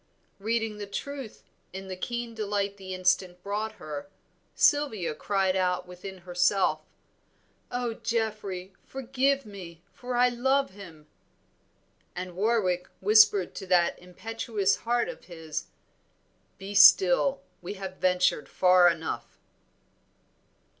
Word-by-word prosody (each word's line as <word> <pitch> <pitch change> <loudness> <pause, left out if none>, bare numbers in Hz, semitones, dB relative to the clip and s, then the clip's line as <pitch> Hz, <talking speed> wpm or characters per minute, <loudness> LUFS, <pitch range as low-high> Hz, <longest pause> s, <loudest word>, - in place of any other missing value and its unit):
Reading 225 0 -1
the 205 - -5
truth 270 +3 -6 0.3
in 190 +1 -7
the 185 - -5
keen 235 +4 -4
delight 205 -2 -2
the 190 -1 -9
instant 185 -1 0
brought 210 +2 -3
her, 155 -4 -8 0.5
Sylvia 225 - +2
cried 190 +3 0
out 180 -1 0
within 180 +1 -9
herself, 180 -2 +2 0.9
"Oh, 245 -1 -2
Geoffrey, 215 -5 -3
forgive 270 +1 0
me, 175 -5 -10
for 250 0 -5
I 250 +1 +5
love 265 +1 +1
him!" 175 -6 -13 1.1
and 180 0 -6
Warwick 190 -3 +1
whispered 205 -2 +5
to 190 - -8
that 180 -2 +3
impetuous 200 +2 -2
heart 240 0 0
of - - -8
his, 160 -3 -6 0.9
"Be 195 +1 -7
still, 200 +6 +6 0.2
we 180 +3 -6
have 190 -1 -7
ventured 180 -4 +1
far 180 -1 +5
enough." 165 -1 -4
195 Hz, 115 wpm, -28 LUFS, 180-225 Hz, 1.1 s, still